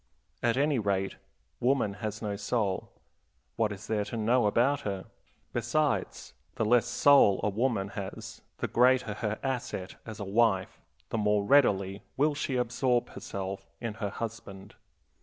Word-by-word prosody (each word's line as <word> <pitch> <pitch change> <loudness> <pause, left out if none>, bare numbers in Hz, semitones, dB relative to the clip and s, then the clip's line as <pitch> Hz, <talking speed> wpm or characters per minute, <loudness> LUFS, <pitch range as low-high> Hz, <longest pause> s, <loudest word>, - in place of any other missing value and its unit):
At 120 0 +2
any 145 -1 +2
rate, 100 -2 -1 0.4
woman 125 -5 +2
has 110 0 -4
no 105 -1 -2
soul 105 -1 -1 0.7
what 110 -2 +1
is 100 +1 -7
there 105 -2 0
to 110 +3 -5
know 115 +1 +3
about 130 +7 +2
her? 100 -6 -4 0.5
Besides, 130 +6 -1 0.2
the 110 - 0
less 120 +1 +4
soul 120 -5 +5
a - - +2
woman 105 -2 0
has 100 -1 -7 0.2
the - - -2
greater 125 -2 +3
her 105 0 -2
asset 125 -8 -3
as 110 -2 -8
a 100 - -4
wife, 100 -2 +1 0.3
the 115 - -1
more 105 -1 +2
readily 100 -6 +3 0.2
will 150 +2 +3
she 145 -2 -2
absorb 125 0 +1
herself 95 0 -6
in 115 -2 -4
her 100 - 0
husband. 100 -3 -7
110 Hz, 150 wpm, -29 LUFS, 100-125 Hz, 0.7 s, soul